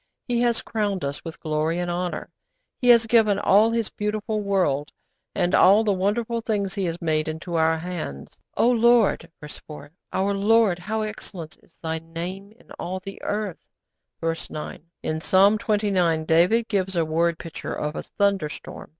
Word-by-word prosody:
He 240 Hz, -1 st, +1 dB
has 240 Hz, -1 st, +1 dB
crowned 205 Hz, -4 st, -2 dB
us 140 Hz, +1 st, -4 dB
with 165 Hz, -1 st, -8 dB
glory 155 Hz, +1 st, -1 dB
and 175 Hz, 0 st, -2 dB
honour. 175 Hz, 0 st, -3 dB, 0.5 s
He 245 Hz, -, +3 dB
has 235 Hz, -1 st, +7 dB
given 220 Hz, -3 st, +4 dB
all 205 Hz, +2 st, +4 dB
His 230 Hz, -2 st, -1 dB
beautiful 210 Hz, +1 st, -2 dB
world, 185 Hz, -8 st, 0 dB, 0.4 s
and 175 Hz, 0 st, +1 dB
all 200 Hz, +4 st, +6 dB
the 210 Hz, -2 st, +2 dB
wonderful 220 Hz, +5 st, -1 dB
things 205 Hz, -4 st, -1 dB
He 195 Hz, -2 st, -2 dB
has 170 Hz, 0 st, -3 dB
made, 155 Hz, -2 st, 0 dB
into 160 Hz, +3 st, -5 dB
our 160 Hz, 0 st, +3 dB
hands. 160 Hz, -, -7 dB, 0.2 s
'O -, -, +4 dB
Lord 235 Hz, -7 st, +3 dB
(verse 150 Hz, 0 st, -10 dB
4) 150 Hz, -1 st, -11 dB, 0.2 s
our 195 Hz, +2 st, 0 dB
Lord, 205 Hz, -2 st, +3 dB
how 215 Hz, +5 st, -2 dB
excellent 195 Hz, -6 st, -7 dB
is -, -, -28 dB
Thy 160 Hz, 0 st, -2 dB
name 175 Hz, +5 st, -7 dB
in 230 Hz, -, -23 dB
all 185 Hz, +2 st, -3 dB
the 195 Hz, +1 st, -9 dB
earth.' 205 Hz, -4 st, -4 dB, 0.5 s
(Verse 165 Hz, 0 st, -3 dB
9.) 150 Hz, 0 st, -7 dB, 0.2 s
In 155 Hz, 0 st, -2 dB
Psalm 200 Hz, +5 st, +4 dB
xxix. 190 Hz, -7 st, +1 dB
David 180 Hz, +9 st, +3 dB
gives 190 Hz, -3 st, -1 dB
a 165 Hz, -1 st, +2 dB
word 165 Hz, +1 st, +1 dB
picture 165 Hz, -, -6 dB
of 150 Hz, 0 st, -3 dB
a -, -, -3 dB
thunderstorm. 195 Hz, -7 st, -2 dB
190 Hz, 170 wpm, -24 LUFS, 165-215 Hz, 0.5 s, has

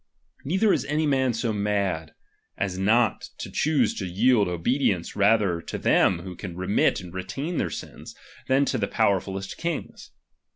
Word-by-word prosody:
Neither 190 Hz, +8 st, +2 dB
is -, -, 0 dB
any 155 Hz, +1 st, 0 dB
man 130 Hz, -3 st, +2 dB
so 115 Hz, 0 st, -1 dB
mad, 100 Hz, -6 st, -1 dB, 0.4 s
as 95 Hz, -2 st, -2 dB
not 110 Hz, +3 st, +2 dB
to -, -, -7 dB
choose 155 Hz, -1 st, +2 dB
to 95 Hz, -, -3 dB
yield 105 Hz, +3 st, +3 dB
obedience 90 Hz, -, 0 dB
rather 100 Hz, -4 st, +3 dB
to -, -, -6 dB
them 85 Hz, -2 st, +3 dB
who 90 Hz, -1 st, -7 dB
can 85 Hz, -1 st, -8 dB
remit 95 Hz, +3 st, +2 dB
and 90 Hz, -2 st, -11 dB
retain 100 Hz, -, -4 dB
their -, -, 0 dB
sins, -, -, -8 dB, 0.3 s
than 135 Hz, +2 st, +3 dB
to 130 Hz, -, -1 dB
the 100 Hz, -, 0 dB
powerfulest 95 Hz, -2 st, -1 dB
kings. 170 Hz, -1 st, -5 dB
105 Hz, 160 wpm, -25 LUFS, 95-130 Hz, 0.4 s, yield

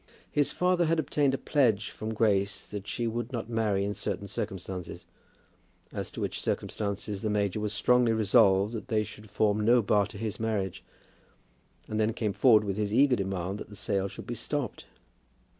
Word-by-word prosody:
His 145 Hz, -1 st, +2 dB
father 180 Hz, -1 st, +2 dB
had 165 Hz, +1 st, +2 dB
obtained 145 Hz, -2 st, +1 dB
a -, -, -3 dB
pledge 115 Hz, -10 st, +1 dB
from 110 Hz, +1 st, -5 dB
Grace 100 Hz, -2 st, +1 dB
that 100 Hz, -1 st, -7 dB
she 120 Hz, -, -2 dB
would 120 Hz, +1 st, -3 dB
not 115 Hz, -2 st, -4 dB
marry 105 Hz, -4 st, +1 dB
in 100 Hz, -, -1 dB
certain 100 Hz, -1 st, -4 dB
circumstances, 95 Hz, -2 st, -5 dB, 0.9 s
as -, -, -4 dB
to -, -, -8 dB
which -, -, -2 dB
circumstances 100 Hz, -1 st, -3 dB
the 110 Hz, -, -1 dB
major 105 Hz, -1 st, 0 dB
was 105 Hz, -1 st, -2 dB
strongly 125 Hz, +3 st, +3 dB
resolved 105 Hz, -2 st, +4 dB
that 115 Hz, +1 st, -5 dB
they 110 Hz, -4 st, +1 dB
should 105 Hz, 0 st, -10 dB
form 105 Hz, +1 st, +1 dB
no 120 Hz, +2 st, +5 dB
bar 100 Hz, 0 st, +3 dB
to 105 Hz, -, -10 dB
his 105 Hz, -1 st, -4 dB
marriage, 105 Hz, -5 st, -2 dB, 1.0 s
and 110 Hz, -, -2 dB
then 110 Hz, +1 st, +2 dB
came 105 Hz, -3 st, -1 dB
forward 110 Hz, -3 st, +5 dB
with 100 Hz, -1 st, -3 dB
his 105 Hz, -1 st, -1 dB
eager 130 Hz, +3 st, +5 dB
demand 95 Hz, 0 st, -3 dB
that -, -, -8 dB
the 105 Hz, -, -11 dB
sale 100 Hz, -1 st, -1 dB
should 100 Hz, -, -9 dB
be 120 Hz, -, -4 dB
stopped! 140 Hz, +3 st, -4 dB
105 Hz, 185 wpm, -29 LUFS, 100-115 Hz, 1.0 s, no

